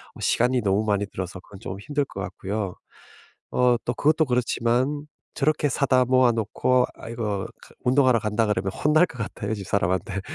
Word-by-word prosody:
어 -, -, -13 dB
시간이 125 Hz, +1 st, +2 dB
너무 100 Hz, +1 st, +1 dB
많이 100 Hz, -1 st, +1 dB
들어서 95 Hz, -1 st, -6 dB
그건 100 Hz, 0 st, -14 dB
좀 95 Hz, -, -5 dB
힘들 145 Hz, +5 st, -1 dB
것 100 Hz, -, -7 dB
같고요. 100 Hz, -1 st, -4 dB, 0.8 s
어 125 Hz, -1 st, +4 dB
또 120 Hz, -, 0 dB
그것도 155 Hz, +4 st, +3 dB
그렇지만 125 Hz, +2 st, 0 dB, 0.3 s
저렇게 150 Hz, +1 st, +2 dB
사다 130 Hz, -2 st, +2 dB
모아 130 Hz, -1 st, +4 dB
놓고 125 Hz, +3 st, +1 dB
아 -, -, -10 dB
이거 105 Hz, -4 st, -2 dB, 0.2 s
그 -, -, -16 dB
운동하러 130 Hz, -2 st, +4 dB
간다 105 Hz, +1 st, 0 dB
그러면 100 Hz, -2 st, 0 dB
혼날 155 Hz, +3 st, +4 dB
것 160 Hz, -, -12 dB
같아요 105 Hz, 0 st, -3 dB
집사람한테. 95 Hz, -1 st, -1 dB
115 Hz, 360 characters per minute, -24 LUFS, 100-130 Hz, 0.8 s, 어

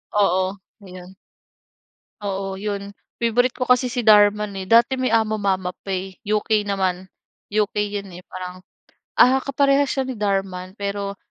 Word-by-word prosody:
Oo, 190 Hz, -2 st, +3 dB, 0.4 s
'yon. 185 Hz, 0 st, -12 dB, 1.1 s
Oo, 195 Hz, -1 st, -3 dB
'yon. 200 Hz, 0 st, -5 dB, 0.2 s
Favorite 240 Hz, +2 st, +2 dB
ko 255 Hz, -, -1 dB
kasi 250 Hz, 0 st, +3 dB
si 240 Hz, 0 st, -2 dB
Dhar 205 Hz, -1 st, +8 dB
Mann 210 Hz, -1 st, -5 dB
eh. 190 Hz, -, -5 dB
Dati 235 Hz, +3 st, +5 dB
may 255 Hz, -, +1 dB
AmoMama 205 Hz, -5 st, +1 dB
pa 195 Hz, -, -7 dB
eh, 190 Hz, 0 st, -3 dB
UK 215 Hz, 0 st, +1 dB
naman. 190 Hz, -2 st, -1 dB, 0.4 s
UK 210 Hz, 0 st, 0 dB
'yon, 205 Hz, -1 st, -4 dB
eh, 180 Hz, -, -10 dB
parang, 185 Hz, 0 st, -8 dB, 0.6 s
ah, 260 Hz, +2 st, +6 dB
kaparehas 275 Hz, 0 st, +2 dB
siya 270 Hz, -, 0 dB
ni 260 Hz, -, -4 dB
Dhar 200 Hz, -2 st, +1 dB
Mann, 185 Hz, 0 st, -9 dB
pero 200 Hz, 0 st, -3 dB
205 Hz, 155 wpm, -22 LUFS, 190-225 Hz, 1.1 s, Dhar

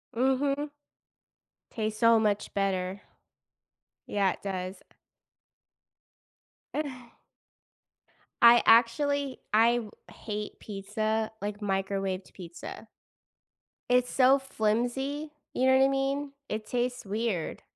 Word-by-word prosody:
Mhm. 275 Hz, +4 st, +1 dB, 1.0 s
Tastes 215 Hz, -1 st, -3 dB
so 230 Hz, -1 st, +6 dB
much 210 Hz, -2 st, 0 dB
better. 190 Hz, -1 st, -1 dB, 1.1 s
Yeah, 195 Hz, -2 st, +2 dB
it -, -, -15 dB
does. 185 Hz, -1 st, -4 dB, 2.0 s
Uh. 260 Hz, -5 st, -4 dB, 1.3 s
I 235 Hz, 0 st, +8 dB
actually 270 Hz, +4 st, +3 dB
I 230 Hz, +2 st, +5 dB
w 220 Hz, -3 st, -5 dB, 0.2 s
hate 210 Hz, -1 st, -6 dB
pizza, 215 Hz, +2 st, -2 dB
like, 205 Hz, 0 st, -4 dB
microwaved 195 Hz, -1 st, -2 dB
pizza. 175 Hz, +4 st, -9 dB, 1.0 s
It's 250 Hz, 0 st, +3 dB
so 265 Hz, +1 st, +5 dB
flimsy, 265 Hz, +4 st, -1 dB, 0.2 s
you 255 Hz, -, +1 dB
know 260 Hz, 0 st, +6 dB
what 265 Hz, -, +5 dB
I -, -, +5 dB
mean? 275 Hz, +1 st, -1 dB, 0.2 s
It 215 Hz, 0 st, -4 dB
tastes 245 Hz, 0 st, -2 dB
weird. 205 Hz, -4 st, -2 dB
225 Hz, 100 wpm, -29 LUFS, 205-260 Hz, 2.0 s, I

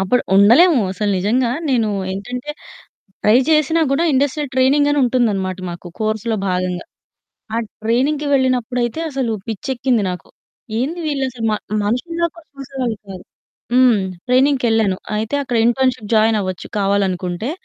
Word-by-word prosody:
అప్పుడు 195 Hz, +6 st, +1 dB
ఉండలేము. 250 Hz, -, +6 dB
అసలు 205 Hz, +2 st, -1 dB
నిజంగా 235 Hz, +6 st, +1 dB, 0.2 s
నేనూ 235 Hz, -5 st, +1 dB, 0.2 s
ఏంటంటే, 245 Hz, +8 st, -5 dB, 0.7 s
ట్రై 210 Hz, +2 st, +6 dB
చేసినా 310 Hz, +1 st, +3 dB
గూడా, 280 Hz, +5 st, +2 dB
ఇండస్ట్రియల్ 285 Hz, +1 st, 0 dB
ట్రైనింగనుంటుందనమాట 255 Hz, -8 st, +2 dB
మాకు, 175 Hz, +1 st, -9 dB
కోర్స్‌‌లో 220 Hz, +1 st, -1 dB
భాగంగా. 180 Hz, -1 st, -2 dB, 0.7 s
ఆ -, -, 0 dB, 0.3 s
ట్రైనింగ్‌కి 275 Hz, +6 st, +1 dB
వెళ్ళినప్పుడైతే, 250 Hz, 0 st, 0 dB
అసలు 260 Hz, -5 st, -1 dB, 0.2 s
పిచ్చెక్కింది 240 Hz, +1 st, -1 dB
నాకు. 180 Hz, -2 st, -7 dB, 0.5 s
ఏంది 315 Hz, +8 st, -2 dB
వీళ్ళసలు 265 Hz, -5 st, -3 dB
మ -, -, +1 dB, 0.3 s
మనుషుల్లా 335 Hz, +10 st, -1 dB
కూడా 335 Hz, -2 st, -16 dB
చూసేవాళ్ళు 260 Hz, -4 st, -4 dB
కాదు. 185 Hz, -2 st, -9 dB, 0.5 s
హ్మ్. 250 Hz, -4 st, +5 dB, 0.3 s
ట్రైనింగ్‌కెళ్ళాను. 245 Hz, -6 st, +2 dB, 0.2 s
అయితే, 220 Hz, +6 st, -2 dB
అక్కడ 245 Hz, -3 st, -2 dB
ఇంటర్న్‌షిప్ 245 Hz, -3 st, 0 dB
జాయినవ్వచ్చు, 215 Hz, -4 st, +1 dB
కావాలనుకుంటే. 195 Hz, +1 st, -1 dB
240 Hz, 115 wpm, -18 LUFS, 210-270 Hz, 0.7 s, ఉండలేము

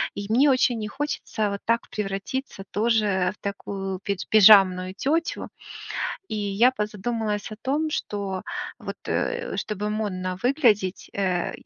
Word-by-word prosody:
И 200 Hz, 0 st, -5 dB
мне 265 Hz, +6 st, +5 dB
очень 250 Hz, -2 st, +2 dB
не 215 Hz, -, -3 dB
хочется 220 Hz, -4 st, -2 dB
вот 200 Hz, -, -4 dB
так 230 Hz, +1 st, +1 dB
превратиться 200 Hz, +2 st, -4 dB
тоже 210 Hz, -4 st, +2 dB
в -, -, -44 dB
такую 195 Hz, -1 st, -4 dB
пидж 200 Hz, -2 st, -2 dB
пижамную 190 Hz, -3 st, +7 dB
тётю, 330 Hz, +3 st, 0 dB, 0.8 s
и -, -, -4 dB
я 210 Hz, +4 st, +3 dB
позадумалась 210 Hz, -1 st, -2 dB
о -, -, -7 dB
том, 300 Hz, +4 st, 0 dB
что, 200 Hz, -8 st, -3 dB, 0.4 s
вот, -, -, -6 dB
э, 485 Hz, 0 st, -1 dB
чтобы 210 Hz, 0 st, -2 dB
модно 185 Hz, -4 st, -2 dB
выглядеть, 225 Hz, -, +2 dB
э, 185 Hz, -3 st, 0 dB
210 Hz, 135 wpm, -25 LUFS, 195-235 Hz, 0.8 s, пижамную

